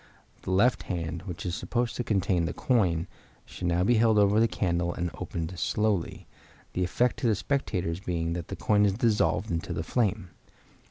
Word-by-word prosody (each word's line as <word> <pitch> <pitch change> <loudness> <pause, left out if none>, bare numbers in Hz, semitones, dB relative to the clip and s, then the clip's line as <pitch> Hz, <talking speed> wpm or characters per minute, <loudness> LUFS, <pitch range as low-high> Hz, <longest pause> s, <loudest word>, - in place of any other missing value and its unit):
The - - -7
left 105 +7 +3
hand, 85 -2 -3
which 90 0 -6
is 90 - -2
supposed 120 +5 -2
to 125 - -2
contain 95 -6 +1
the 80 - -4
coin, 90 -10 +1 0.4
should 90 - -5
now 85 +1 +2
be 120 - +3
held 110 -1 +4
over 105 +1 +4
the 115 - +5
candle 85 -4 0
and 85 -1 -3
opened 85 +1 -5
slowly, 100 0 0 0.5
the 90 - 0
effect 120 +8 +1
to 120 - 0
the 110 - +3
spectators 95 -9 -1
being 85 -3 -2
that 85 -1 -5
the - - -5
coin 105 -1 +2
is 100 -2 +3
dissolved 110 -2 +1
into 85 -1 -2
the 80 - -3
flame. 105 -3 -1
95 Hz, 185 wpm, -28 LUFS, 85-110 Hz, 0.5 s, the